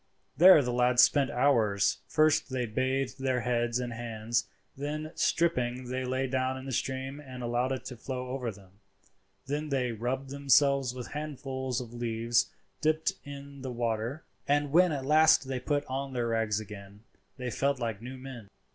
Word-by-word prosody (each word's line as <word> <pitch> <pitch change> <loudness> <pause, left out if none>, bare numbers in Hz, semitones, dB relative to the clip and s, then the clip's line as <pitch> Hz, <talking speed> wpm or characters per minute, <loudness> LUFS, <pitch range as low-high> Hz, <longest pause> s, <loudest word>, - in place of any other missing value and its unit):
There 170 0 +8
the 125 -1 -2
lads 125 0 +5
spent 140 -3 +4
hours. 115 -7 +2
First 155 +3 +3
they 130 -2 -1
bathed 130 +3 -1
their 130 -2 0
heads 120 0 0
and 120 -1 -3
hands, 115 0 -2 0.3
and 140 - -9 0.2
then 155 - -8
stripping, 125 -7 0
lay 130 +1 -1
down 130 0 -1
in 130 - -8
the 135 - -5
stream 135 +3 -3
and 130 -4 -8
allowed 120 +2 0
it 130 - -3
to 125 - -7
flow 125 +1 -5
over 125 -2 -3
them; 95 -1 -18 0.7
then 150 +2 -3
they 130 -3 0
rubbed 130 +4 -3
themselves 140 -2 +3
with 125 -1 -6
handfuls 135 -4 -3
of 120 -2 -8
leaves 120 0 0 0.3
dipped 155 +4 +1
in 140 -1 -9
the 130 -1 -4
water; 120 +4 -2 0.2
and 145 0 +2
when 180 +3 +6
they 155 - -1
at 135 - -6
last 155 -1 +5 0.2
put 145 -1 +1
on 135 +1 -4
their 120 -2 -1
rags 110 -2 +1
again 105 -1 -10 0.3
they 125 -2 -4
felt 140 +4 0
like 115 -4 -3
new 130 +2 -7
men. 130 -5 -9
130 Hz, 175 wpm, -29 LUFS, 120-140 Hz, 0.7 s, There